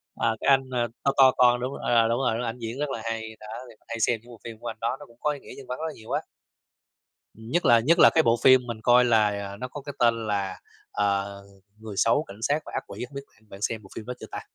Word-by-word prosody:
À, 115 -1 0
cái - - +2
anh, 135 -1 +4
ơ, 120 -2 0 0.2
to 140 - +4
to 130 -1 +8
con 125 -1 +5
đúng 130 +3 -3
ờ, 115 -1 +3
đúng 115 +1 +1
rồi, 125 -4 +1
đúng, 125 - -3
ảnh 115 +2 -4
diễn 115 +4 -5
rất 150 -1 -1
là 115 -4 -4
hay, 110 -1 -4
đó 110 - -11 0.2
thì 115 - -15
hay 115 0 -5
xem 115 0 +2
những 120 - -19
bộ 115 - -13
phim 115 -2 -9
của 120 - -8
anh - - -5
đó 115 +3 -1
nó 145 - -10
cũng 120 0 -21
có 150 - +1
ý 145 - -6
nghĩa - - -12
nhân 135 - -11
văn 125 - -5
rất 160 - -3
là 155 - -5
nhiều 110 - -12
á. - - +1 1.1
Nhất 115 +11 -2
là 115 -1 +6
nhất 165 +9 +3
là - - +8
cái 160 - +5
bộ 115 -2 +3
phim 130 -1 +6
mình 115 -2 -5
coi 125 0 +6
là, 110 -3 +4
à, 100 -1 -5
nó 125 +4 -5
có 145 - -8
cái 145 +1 -7
tên 115 -2 +2
là, 100 -2 -2 0.3
ờ, 100 -1 -1 0.4
Người 110 -2 -8
xấu, 120 +10 +3
cảnh 100 +3 -12
sát 145 +4 +1
và - - -9
ác - - -2
quỷ, - - -6
hổng 140 - -19
biết 140 - -5
bạn 110 -1 -28
bạn 100 +1 -12
xem 110 -1 -1
bộ 95 - -15
phim 110 - -7
đó 125 - -4
chưa - - -8
ta? - - -5
115 Hz, 295 wpm, -26 LUFS, 110-130 Hz, 1.1 s, to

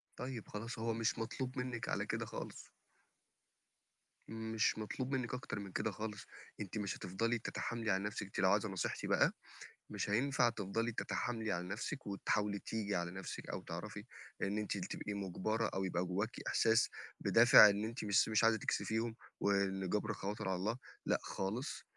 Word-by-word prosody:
طيب 125 -4 -5
خلاص 115 +3 -5
هو 115 0 0
مش 115 0 0
مطلوب 125 +3 -3
منِّك 125 -2 -2
على - - 0
كده - - -2
خالص. - - -7 1.6
مش 110 -1 +1
مطلوب 125 +5 -3
منِّك 125 -2 -2
أكتر 125 -4 -3
من 100 -1 -6
كده 110 +3 0
خالص، 105 +1 -5 0.4
أنتِ 105 +1 -4
مش 100 -2 -2
هتفضلي 115 +6 0
تتحاملي 115 -1 -2
على 95 +1 +1
نَفْسِك، 105 0 -3
أنتِ 95 - -6
لو 95 0 +5
عايزة 105 +1 +2
نصيحتي 95 -1 -2
بقى، - - +4 0.6
مش - - -2
هينفع 125 +3 +3
تفضلي 115 +1 -1
تتحاملي 115 -1 -2
على 90 0 -2
نَفْسِك 110 +7 -4
وتحاولي 100 +1 0
تيجي 105 -2 -2
على 85 0 -1
نَفْسِك 95 0 -6
أو - - -3
تعرفي - - -6 0.4
إن 100 +2 0
أنتِ 105 -1 -1
تبقي 100 +2 -4
مُجبرة 100 +3 -1
أو 95 - 0
يبقى 90 -1 0
جوّاكِ 100 +6 -2
إحساس 115 +1 +4 0.3
بِدافع 115 -2 +9
إن 100 +1 0
أنتِ 115 +2 -4
مش 105 +2 +4
مش 110 +1 +3
عايزة 115 0 +5
تكسفيهم 110 +2 0 0.2
وإن 95 -2 +1
جبر 105 +1 0
الخواطر 100 -1 -3
على 95 - +1
الله، 105 +6 -1 0.3
لأ - - +3
خالص، 110 +9 -3
105 Hz, 165 wpm, -37 LUFS, 100-115 Hz, 1.6 s, بِدافع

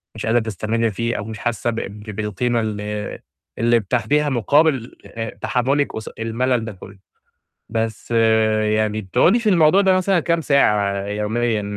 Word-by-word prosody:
مش 110 - -5
قادرة 115 +2 +3
تستمرّي 110 +1 -1
فيه 115 +4 -2
أو 105 - -4
مش 110 -1 -7
حاسّة 120 0 -1
بق 115 - -3
بالقيمة 105 +3 -3
اللي 105 -1 -4 0.4
اللي 120 0 +3
بتاخديها 125 +8 0
مقابل 135 +1 +1
آآ، 115 -1 -5
تحمُّلِك 140 +4 0
قص 110 - -6
المَلَل 115 +1 -1
ده 110 - -5
كُلّه. 95 +1 -13 0.7
بس 115 0 -3 0.7
يعني 110 0 0
بتقعُدي 165 - +3
في 220 - 0
الموضوع 180 -1 +5
ده 190 -1 +4
مثلًا 185 -1 +2
كام 170 +1 0
ساعة 105 -9 +2
يوميًا 105 +2 -1
115 Hz, 150 wpm, -20 LUFS, 105-130 Hz, 0.7 s, الموضوع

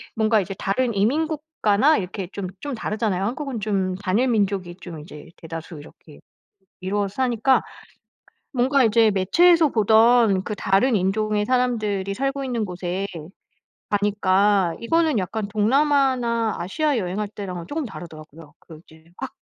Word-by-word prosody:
뭔가 220 -1 +2
이제 195 +1 -6
다른 235 +3 -1
이민 260 +11 +1
국가나 305 -4 +1
이렇게 185 0 -5
좀 200 -2 -4
좀 290 -1 -4
다르잖아요. 215 -4 -2
한국은 260 +1 -4
좀 195 -3 -1
단일 205 +6 0
민족이 195 -5 -1
좀 170 -3 -8
이제 150 0 -12
대다수 165 0 -8
이렇게 145 0 -15 0.6
이루어서 200 +1 -2
사니까 255 0 +2 0.9
뭔가 265 +1 +2
이제 225 -1 +4
매체에서 330 - +4
보던 220 -3 +4
그 210 - -5
다른 210 +6 +2
인종의 210 +2 0
사람들이 215 -6 0
살고 275 +4 -2
있는 245 -4 -2
곳에 180 +1 -4 0.8
가니까 200 -2 +2
이거는 315 +1 +1
약간 200 +3 -3
동남아나 240 0 +1
아시아 290 - -1
여행할 205 0 -2
때랑은 185 -5 -7
쪼금 300 - -3
다르더라요. 170 -8 -9 0.4
그 160 -2 -14
이제 160 0 -19
확 - - -6
210 Hz, 320 characters per minute, -22 LUFS, 190-250 Hz, 0.9 s, 이제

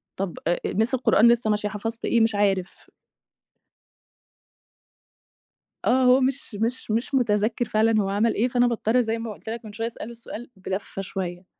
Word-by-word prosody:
"طَب 190 -2 -4
أ 175 - +2 0.2
miss 225 +6 +1
القرآن 235 -3 +4
لسه 235 -2 +3
ماشية، 210 0 0
حفظت 225 +3 -5
إيه؟" 235 - +3
"مش 225 -2 +2
عارف." 195 -3 -1 3.0
آه، 260 +1 +3
هو 255 +1 +5
مش 260 -3 -2
مش 230 +2 -2
مش 235 +6 -1
متذكر 220 -1 +1
فعلًا 220 0 +2
هو 195 - -1
عمل 210 +3 +2
إيه، 235 - +2
فأنا 245 -1 +2
باضطر 235 +1 +1
زي 225 -1 -2
ما 225 -1 -5
قُلت 220 - -10
لك 230 0 -5
من 210 - -9
شوية 225 +1 -2
أسأله 230 -1 -7
السؤال 235 +1 -8
بلفّة 190 +1 -5
شوية، 185 -2 -5
225 Hz, 165 wpm, -24 LUFS, 205-235 Hz, 3.0 s, هو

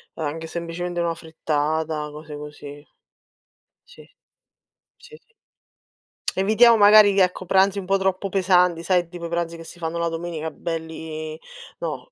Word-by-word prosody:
anche 160 +1 -4
semplicemente 175 +1 -4
una 170 -1 0
frittata, 155 -1 -2
cose 150 0 -9
così. 145 0 -10 1.0
Sì. 485 - -15 0.9
Sì, 460 - -15
sì. 460 - -34 1.1
Evitiamo 220 +4 +5
magari 205 0 +7
che 195 -1 +5
ecco 180 0 -2
pranzi 195 +2 +3
un 190 - -7
po' 195 +1 +2
troppo 190 0 -1
pesanti, 180 -3 +2
sai 180 -2 +1
tipo 175 -1 -8
i - - -5
pranzi 170 0 -2
che 165 - -11
si 175 - -12
fanno 165 0 -3
la 170 0 0
domenica 165 -1 -4
belli 160 -1 -6 0.4
no. - - -5
170 Hz, 145 wpm, -23 LUFS, 160-190 Hz, 1.1 s, magari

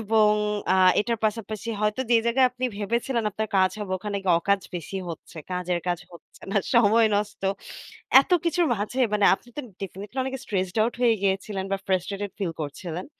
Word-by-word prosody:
এবং 215 0 +3 0.4
আ - - +4 0.2
এইটার 230 +1 0
পাশাপাশি 215 +1 -2
হয়তো 210 +3 0
যে 235 - +6
জায়গায় 255 +2 +4
আপনি 250 +1 -5
ভেবেছিলেন 235 +3 -1
আপনার 220 +2 -3
কাজ 185 0 +4
হবে 205 -3 -4
ওখানে 205 +1 -4
গিয়ে 175 -2 +4
অকাজ 200 +3 +1 0.2
বেশি 175 +3 -6
হচ্ছে। 165 +1 -10
কাজের 180 -1 -1
কাজ 175 -1 0
হচ্ছে 170 - -17
না, - - 0 0.2
সময় 230 0 +5
নষ্ট। 210 0 -3 0.8
এত - - -13
কিছুর 335 +1 +2
মাঝে 210 +5 -4 0.2
মানে 205 -1 +3
আপনি 240 - -20
তো 295 - -1 0.2
ডেফিনিটলি 195 +5 -7
অনেক 265 0 -4
স্ট্রেসড 185 -2 -2
আউট 230 +2 +1
হয়ে 240 -2 +5
গিয়েছিলেন 195 0 -1
বা 195 - +1
ফ্রাস্ট্রেটেড 195 +2 -1
ফিল 190 -4 -1
করছিলেন। 165 +4 -5
205 Hz, 175 wpm, -25 LUFS, 190-230 Hz, 0.8 s, যে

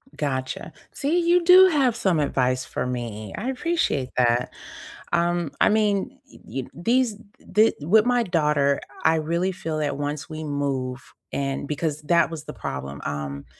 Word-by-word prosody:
Gotcha. 130 +1 -3 0.2
See, 310 +6 0
you 345 +1 +3
do 370 +2 +8
have 270 -8 +2
some 190 -8 +1
advice 130 -3 0
for - - -3
me, 115 -5 -5
I 235 +6 -3
appreciate 265 - -1
that. 120 0 +2 0.6
Um, 170 -2 +1
I - - +6
mean, 210 +4 +1
e - - -17
e 135 - -4
eh - - -16
these 230 - +1 0.4
d 215 +3 +4
the 145 - -8
with 215 +6 +5
my 245 -1 +2
daughter, 150 -7 +1 0.2
I 160 - +4
really 170 +4 0
feel 160 -3 -4
that 150 -2 -1
once 145 +2 -4
we 155 0 -6
move 135 -3 -3 0.2
and 135 0 -2
because 150 0 -2
that 170 +1 +3
was 160 -2 -7
the - - -8
problem, 70 +1 -6
um, 70 -1 -4
155 Hz, 170 wpm, -24 LUFS, 135-215 Hz, 0.6 s, do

